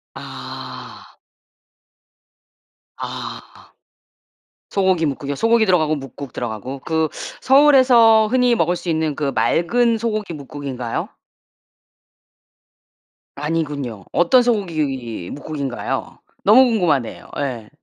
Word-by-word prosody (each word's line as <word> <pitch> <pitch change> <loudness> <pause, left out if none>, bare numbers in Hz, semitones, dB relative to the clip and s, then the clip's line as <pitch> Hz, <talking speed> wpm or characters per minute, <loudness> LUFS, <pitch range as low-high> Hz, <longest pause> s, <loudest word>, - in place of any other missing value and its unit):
아. - - -9 1.8
아 - - -6 1.3
소고기뭇국이요. 160 -8 0
소고기 225 +5 +3
들어가고 160 -5 +2
뭇국 135 -1 -8
들어가고 120 +3 -5
그 160 +3 0 0.3
서울에서 255 -6 +6
흔히 250 0 +3
먹을 175 -3 +1
수 175 - -6
있는 160 -2 0
그 140 -2 -1
맑은 230 +7 +2
소고기뭇국인가요? 145 - -4 2.3
아니군요. 145 - -3
어떤 245 +9 +4
소고기뭇국인가요? 145 - -3 0.2
너무 245 +6 +7
궁금하네요. 175 - 0
예. 125 -6 -4
160 Hz, 225 characters per minute, -20 LUFS, 140-220 Hz, 2.3 s, 너무